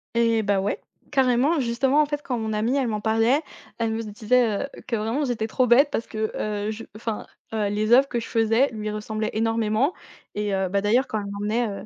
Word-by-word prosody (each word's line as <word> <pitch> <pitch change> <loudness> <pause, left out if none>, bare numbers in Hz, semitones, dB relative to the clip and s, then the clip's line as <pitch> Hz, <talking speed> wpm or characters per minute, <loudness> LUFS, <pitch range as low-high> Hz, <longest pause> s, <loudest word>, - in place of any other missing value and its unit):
Et 230 -1 +3
bah, 200 -1 +2
ouais. 195 +2 -1 0.3
Carrément, 265 +3 +3
justement, 260 +4 +2
en 300 - +3
fait, 290 0 -3
quand 250 -2 -2
mon 220 -1 -2
amie, 220 +5 0
elle 265 -3 +1
m'en 215 -2 -2
parlait, 225 +6 +2 0.4
elle 225 -1 0
me 225 +1 -2
disait, 220 +1 +1
heu, 275 - -4 0.2
que 235 - 0
vraiment 225 +7 -1
j'étais 230 -4 -1
trop 250 +2 +1
bête, 275 +5 +6
parce 230 - -2
que, 220 -1 -3
heu, 210 0 -2
je 225 +1 -7
enfin, 220 -1 -4 0.3
heu, 215 -2 0
les 210 +2 -1
œuvres 265 +3 +7
que 240 -3 -2
je - - -7
faisais 225 +4 +2
lui 215 -2 -4
ressemblaient 215 +1 -3
énormément 225 +5 +1 0.4
et 205 -1 -1
heu, 190 -1 0
bah, 200 +2 +1
d'ailleurs 230 +7 +2
quand 215 - -2
elle 200 -1 -5
m'emmenait, 210 +4 -1
heu, 200 - -6
225 Hz, 225 wpm, -24 LUFS, 215-245 Hz, 0.4 s, œuvres